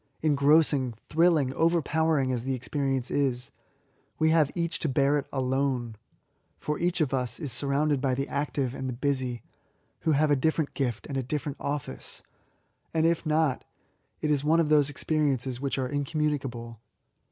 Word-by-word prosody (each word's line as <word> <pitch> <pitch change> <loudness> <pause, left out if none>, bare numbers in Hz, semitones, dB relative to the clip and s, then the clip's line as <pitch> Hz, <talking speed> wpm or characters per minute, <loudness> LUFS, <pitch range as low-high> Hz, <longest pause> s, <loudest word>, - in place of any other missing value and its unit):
Engrossing; 145 -4 +3
thrilling^ 155 -5 +3
overpowering 160 -3 +2
as 120 -2 -2
the 135 +1 -1
experience 135 0 -2
is, 130 -3 0 0.7
we 160 0 +3
have 160 -3 +4
each 170 -1 -2
to 160 - -1
bear 140 +2 +3
it 140 - -7
alone; 130 -3 -1 0.6
for 150 0 -3
each 175 0 +1
of 145 -3 +1
us 125 -3 -1
is 145 - -4
surrounded 140 +3 0
by 130 -2 +1
the 135 +1 -2
active 140 -3 -2
and 130 -1 -4
the 125 - -4
busy^ 130 -3 -1 0.6
who 160 - +1
have 150 +1 +3
a - - +5
different 155 +2 0
gift 120 -5 -2
and 140 - -4
a - - +1
different 145 +2 -4
office 140 - -5 0.3
;— - - -42
and 160 0 +3
if 170 0 +2
not^ 155 -3 +1 0.6
it 155 - +1
is 145 -2 +1
one 160 +3 +3
of 160 -3 +2
those 145 -2 +4
experiences 135 -4 -1
which 140 -1 -1
are 130 -1 -1
incommunicable. 140 -5 -2
140 Hz, 165 wpm, -27 LUFS, 130-155 Hz, 0.7 s, a